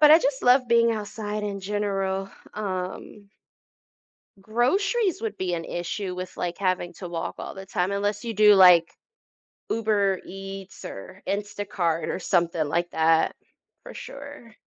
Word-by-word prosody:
but, 300 -1 +8
I 315 - +10
just 275 -3 -1
love 250 +1 +5
being 235 0 +4
outside 210 -1 -4
in 200 -1 -3
general, 195 -1 -1 0.3
um 200 0 -5 1.1
Groceries 370 - +1
would 215 -2 -3
be 185 -1 -1
an 165 -1 -2
issue 180 +3 -4
with, 185 0 -6
like, 175 -1 -3
having 185 -2 -1
to 180 +1 -8
walk 170 -1 -4
all - - -6
the 195 -1 -9
time, 180 +1 0
unless 205 +1 -1
you 230 - -2
do, 210 -1 +7
like, 180 -3 +7 0.8
Uber 205 -4 +1
Eats, 195 0 -9
or 185 - -9
Instacart, 200 -5 -2
or - - -2
something 170 -4 +1
like 170 +4 -1
that, 160 0 +3 0.5
for - - -10
sure. 280 -5 -10
200 Hz, 145 wpm, -25 LUFS, 180-220 Hz, 1.1 s, I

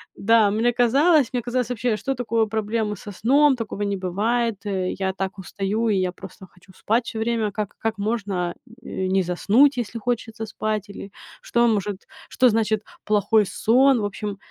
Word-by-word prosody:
да, 220 0 +4
мне 225 +3 +2
казалось 275 +4 +3
мне 245 - 0
казалось 245 0 -2
вообще, 240 -2 -1
что 270 +4 -2
такое 230 -2 0
проблемы 215 0 -2
со 205 +1 -9
сном? 275 +8 +3
Такого 225 -4 -5
не 200 -1 -1
бывает, 220 +5 0 0.4
я 190 -1 0
так 195 +1 -4
устаю 200 +4 -2
и 210 - +2
я 185 -1 0
просто 190 +1 -12
хочу 180 +1 -20
спать 225 +5 0
всё - - -2
время. 225 -2 0
Как 210 0 -4
как 225 -1 -2
можно 200 -5 -2 0.3
не 190 -3 -1
заснуть, 220 +11 +3
э, - - +2
если 230 0 -6
хочется 225 -1 -3
спать 215 -1 -3
или 195 - -8 0.3
что 235 0 +2
может 205 -3 0 0.3
что 255 -1 +4
значит 215 -1 +1 0.2
плохой 210 +1 +2
сон. 250 +7 +3
В - - -3
общем, 205 0 -5
220 Hz, 175 wpm, -23 LUFS, 200-235 Hz, 0.4 s, да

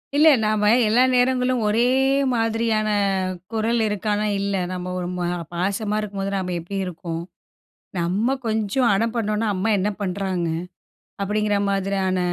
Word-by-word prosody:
இல்லை. 310 +2 +7
நாம 210 -1 +2 0.2
எல்லா 235 +4 +4
நேரங்களும் 250 0 +2
ஒரே 225 +3 +3 0.5
மாதிரியான 225 -2 +1 0.6
குரல் 225 +1 0
இருக்கானா, 210 +1 -1
இல்ல. 200 0 -1 0.2
"நம்ம 180 0 -4
ஒரு 175 - -3
மா 175 - -1 0.3
பாசமா 200 +4 -1
இருக்கும்போது 195 -1 -4
நம்ம 180 -1 -2
எப்டி 175 +4 -6
இருக்கோம். 170 -2 -5 0.8
நம்ம 195 +10 +1
கொஞ்சம் 220 +3 +1
அடம் 225 +3 0
பண்ணோம்னா. 215 0 0
அம்மா 195 +4 0
என்ன 200 +2 0
பண்றாங்க." 185 -2 -2 0.7
அப்டிங்கிற 210 +1 0
மாதிரியான, 195 -1 0
210 Hz, 125 wpm, -22 LUFS, 190-225 Hz, 0.8 s, இல்லை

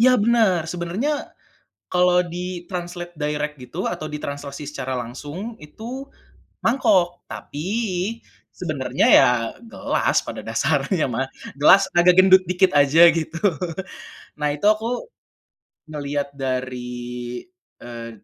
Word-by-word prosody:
Iya, 255 +2 +6
bener. 220 -6 +3
Sebenarnya, 180 - -2 0.8
kalau 180 0 +3
di-translate 175 0 -6
direct 150 0 -2
gitu 125 +9 -5
atau 170 -3 -3
ditranslasi 145 -1 -6
secara 130 -3 -4
langsung 145 - -6
itu, 235 - -8 0.6
mangkok, 185 -8 +2
tapi 150 +6 -6 0.8
sebenarnya - - -1
ya 135 - +8 0.4
gelas, 225 - -1
pada - - -6
dasarnya 185 -7 +1
mah, 130 +3 -1 0.3
gelas 195 +6 +7
agak 175 +1 +6
gendut 190 0 +7
dikit 185 +1 +3
aja, 160 +5 +7
gitu. 160 0 -3 1.0
Nah 150 0 +1
itu 150 - -5
aku, 225 - +1 0.8
ngelihat 145 -1 -3
dari, 125 -2 -4 0.4
eee, 115 -1 -8
170 Hz, 105 wpm, -22 LUFS, 140-185 Hz, 1.0 s, ya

